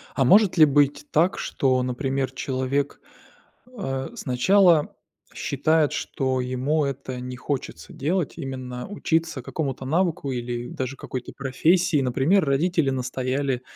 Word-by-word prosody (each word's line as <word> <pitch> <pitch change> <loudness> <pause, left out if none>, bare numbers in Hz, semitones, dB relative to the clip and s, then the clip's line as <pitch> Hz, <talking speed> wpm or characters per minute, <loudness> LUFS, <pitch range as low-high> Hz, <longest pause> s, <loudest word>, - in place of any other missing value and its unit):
А 135 - +2
может 200 - +5
ли 155 - +10
быть 145 0 +2
так, 170 +5 +2
что, 130 -2 +1
например, 130 +1 -2
человек, 130 +2 -2 0.8
а, 135 -7 -3
сначала 165 +5 +3 0.4
считает, 150 +2 +1
что 130 -1 -1
ему 130 +5 0
это 135 -2 -4
не 125 0 -6
хочется 125 - -5
делать, 165 +4 -1
именно 130 -4 -6
учиться 165 -7 -1
какому-то 135 -2 -4
навыку 160 -2 0
или 120 0 -4
даже 130 +1 -4
какой-то 125 -1 -6
профессии? 155 +4 +2
Например, 140 +9 +2
родители 150 +1 +1
настояли, 130 0 -2
135 Hz, 120 wpm, -24 LUFS, 130-155 Hz, 0.8 s, ли